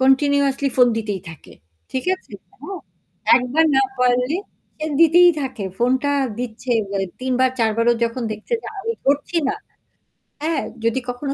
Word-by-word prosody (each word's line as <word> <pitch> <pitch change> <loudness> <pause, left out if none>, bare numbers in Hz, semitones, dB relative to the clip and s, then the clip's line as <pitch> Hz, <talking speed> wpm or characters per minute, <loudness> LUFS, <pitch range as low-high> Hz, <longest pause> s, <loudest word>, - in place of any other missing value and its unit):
continuously 275 +1 +3
phone 250 - +7
দিতেই 210 -4 -3
থাকে, 140 - -14 0.4
ঠিক 260 - -2
আছে? 375 - -19 0.3
হ্যাঁ। 390 -1 -7 0.6
একবার 255 +6 +2
না 270 - +5 0.2
পারলে 250 +4 +2 0.4
সে 310 - -3
দিতেই 345 +2 +7
থাকে। 255 -6 -4
ফোনটা 260 +4 +2 0.3
দিচ্ছে 245 0 -5 0.2
মানে 195 -1 -1
৩ 260 0 -1
বার, 260 - +4
৪ 225 -1 +3
বারও 235 +1 +4
যখন 235 +2 -3
দেখছে 215 - -9
যে - - -9
আমি 455 +4 -2
ধরছি 285 +5 +1
না। - - 0 0.9
হ্যাঁ 320 -3 0 0.2
যদি 230 +3 +1
কখনো 275 +3 -3
260 Hz, 155 wpm, -21 LUFS, 240-285 Hz, 0.9 s, phone